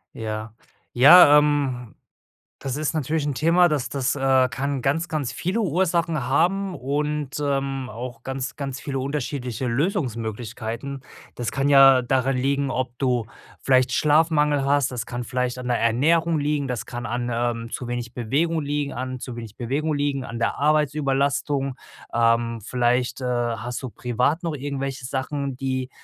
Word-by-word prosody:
Ja. 110 0 -5 0.4
Ja, 145 +4 +9
ähm, 140 -6 0 0.7
das 135 0 -4
ist 155 +1 -1
natürlich 155 0 -1
'n 145 - -1
Thema, 170 +6 +4
das 140 -6 -1
das, 135 0 -1
äh, 135 -2 +3
kann 135 +1 -2
ganz 160 +5 0
ganz 150 -5 -2
viele 195 +6 -2
Ursachen 170 -5 0
haben 185 +7 +1
und, 150 +1 -2
ähm, 135 -2 -1
auch 120 +2 -7
ganz 135 0 -4
ganz 140 -2 -5
viele 135 -3 -4
unterschiedliche 130 -3 -3
Lösungsmöglichkeiten. 120 - -3 0.3
Das 120 -4 -4
kann 135 +1 0
ja 135 -2 +7
daran 130 +1 +1
liegen, 140 +1 0
ob 125 -2 -3
du 125 -4 +1 0.4
vielleicht 130 -1 +3
Schlafmangel 150 -2 +3
hast, 140 -1 +2
das 120 -3 -4
kann 120 0 -4
vielleicht 125 +1 -2
an 125 0 -5
der 120 - +1
Ernährung 160 +8 +2
liegen, 145 -1 -1
das 120 -5 -3
kann 120 0 -6
an, 120 +1 -2
ähm, 115 0 -2
zu 125 - -5
wenig 120 -1 -4
Bewegung 150 +8 0
liegen, 145 0 -2
an 130 +1 -4
zu 125 -1 -7
wenig 115 -3 -9
Bewegung 145 +6 -1
liegen 145 -2 -1
an 115 - -6
der - - -1
Arbeitsüberlastung. 140 -2 +1 0.4
Ähm, 115 -1 +2
vielleicht, 125 +2 0
äh, - - -3
hast 120 0 -2
du 130 - -5
privat 125 - -1
noch 165 - -2
irgendwelche 135 -2 -4
Sachen, 135 +1 -3
die, 130 -1 -3
135 Hz, 155 wpm, -23 LUFS, 125-145 Hz, 0.7 s, Ja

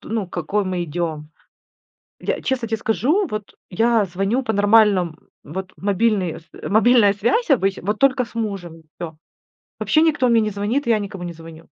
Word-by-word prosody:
Т - - -13
ну, 220 -3 -2
к - - -32
какой 200 +4 -1
мы 180 -2 -2
идем. 155 -2 -4 0.9
Я, - - -2
честно 250 -3 -2
те 225 - 0
скажу, 285 - +1
вот 215 -1 -6
я 225 +2 +2
звоню 195 +8 -1
по 220 - -2
нормальном, 200 -5 +4 0.3
вот 190 +4 -6
мобильный 200 -3 0
с 165 - -27 0.2
мобильная 220 -1 +5
связь 240 - 0
обычно, 195 -8 +2
вот 210 +1 0
только 265 -2 +3
с 230 - -18
мужем, 195 -7 -4
и - - -21 0.2
всё. 160 -2 -6 0.6
Вообще 310 - +2
никто 300 -5 +2
мне 230 -1 +4
не 215 -1 -1
звонит, 210 +8 -1
и - - +4
я 220 - +3
никому 200 -3 -6
не 175 -1 -5
звоню. 165 0 -12
205 Hz, 190 wpm, -21 LUFS, 180-230 Hz, 0.9 s, мобильная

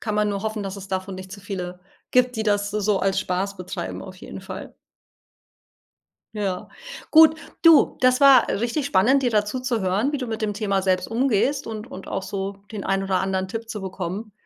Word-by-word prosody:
kann 215 -3 -3
man 210 0 +2
nur 200 -1 -2
hoffen 215 -1 -3
dass 195 0 -5
es 195 -1 -9
davon 190 0 -3
nicht 185 0 -9
zu 200 - -8
viele 180 -3 -5 0.3
gibt 250 0 +3
die 220 - -1
das 205 -1 +1
so 210 - -1
so 205 -1 +2
als 195 0 +1
Spaß 195 +2 -2
betreiben, 180 0 -5
auf - - -10
jeden - - -9
Fall. - - -8 1.6
Ja 195 -3 -3 0.4
gut, 315 0 +7 0.2
du, 330 -2 +6
das 255 0 +4
war 275 -2 +7
richtig 240 +6 -1
spannend 260 +5 +3
dir 245 - +2
da 210 -1 +2
zu 250 +5 -4
zu 250 -4 -1
hören 200 +10 +1
wie - - 0
du 255 - -4
mit 225 -1 -4
dem 210 -1 -1
Thema 200 -2 0
selbst 185 -1 +1
umgehst 255 +3 +1
und 220 +1 -6
und 190 - -9
auch - - -3
so 195 0 -4 0.2
den 205 - -5
ein 195 0 0
oder 190 -1 0
anderen 190 -1 -1
Tipp 225 +2 -6
zu 210 -3 -5
bekommen, 190 +3 -5
205 Hz, 210 wpm, -23 LUFS, 190-230 Hz, 1.6 s, gut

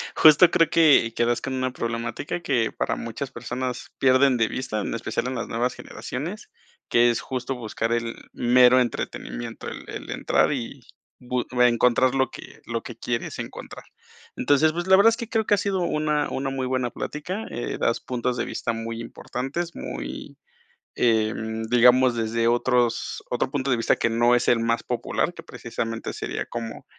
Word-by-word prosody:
justo 160 +3 +7
creo 165 - +3
que 150 -8 +5
que 120 - +2
das 120 0 0
con 135 - -4
una 130 0 -1
problemática 115 +6 -4
que 120 -8 +1
para - - -2
muchas 125 +4 -5
personas 125 0 -5
pierden 130 0 +4
de 115 -1 +2
vista, 125 -4 -3
en - - -3
especial 115 - -2
en 130 - -3
las 120 - -3
nuevas 120 +2 -1
generaciones, 175 - -6 0.4
que 120 0 +5
es 115 - -2
justo 130 0 -4
buscar 115 -1 -3
el 115 0 -2 0.2
mero 125 +1 +5
entretenimiento, 110 - -4
el - - -8
el - - -7
entrar - - +1
y 130 0 -5 0.4
bu 125 0 -2 0.2
encontrar 125 +2 +4
lo 130 0 +1
que - - -12
lo 115 -1 -3
que 120 - -9
quieres 120 0 -3
encontrar, - - -8 0.5
entonces, 145 +2 +3
pues, 175 +2 -3
la 190 - +7
verdad 200 +4 +7
es 225 - -1
que 235 - -6
creo 220 -1 0
que - - +2
ha - - +5
sido 195 -1 -1
una 150 -3 0
una 135 0 -2
muy 135 -1 -2
buena 130 -1 -1
plática, 180 - -5
eh, 120 +2 -4
das 115 - +1
puntos 125 0 -2
de - - -1
vista 120 - -3
muy 115 0 -5
importantes, 135 +8 -5
muy, - - -7 0.6
em, 110 -1 0
digamos, 125 +2 +5
desde 115 0 0
otros 120 0 +1
otro 125 +1 -1
punto 135 -1 -2
de 130 - +4
vista 115 - +2
que - - +1
no 120 +2 +3
es 120 - 0
el 120 - +4
más 115 0 0
popular, 120 -2 -1
que - - -11
precisamente 115 0 -5
sería - - -4
como, 115 -1 -6
125 Hz, 180 wpm, -24 LUFS, 115-135 Hz, 0.6 s, justo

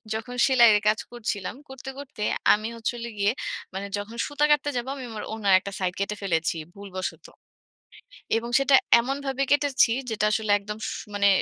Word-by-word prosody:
যখন 235 +3 -5
সেলাইরে 235 -6 +6
কাজ 215 - +1
করছিলাম, 215 -4 -4
করতে, 265 0 -8
করতে, 265 -6 -10 0.3
আমি 215 +1 -1
হচ্ছে 230 +1 -2
হল 235 - -5
গিয়ে 200 +2 +3 0.4
মানে 195 +1 -4
যখন 205 +3 -6
সুতা 290 0 +1
কাটতে 290 0 +3
যাবো, 245 +2 -3
আমি 265 - -7
আমার 215 -1 -6
ওড়নার 205 -3 +1
একটা 200 - -7
সাইড 180 -1 -1
কেটে 200 +1 -1
ফেলেছি, 165 -3 0 0.2
ভুলবশত। 195 -2 -6 1.1
এবং 235 +1 -3
সেটা 275 0 +3 0.3
এমনভাবে 270 +2 -2
কেটেছি, 285 -4 +4 0.2
যেটা 210 -1 -1
আসলে 220 -1 -1
একদম 210 +1 -7
স - - -2 0.2
মানে 200 0 +4
220 Hz, 170 wpm, -25 LUFS, 200-265 Hz, 1.1 s, সেলাইরে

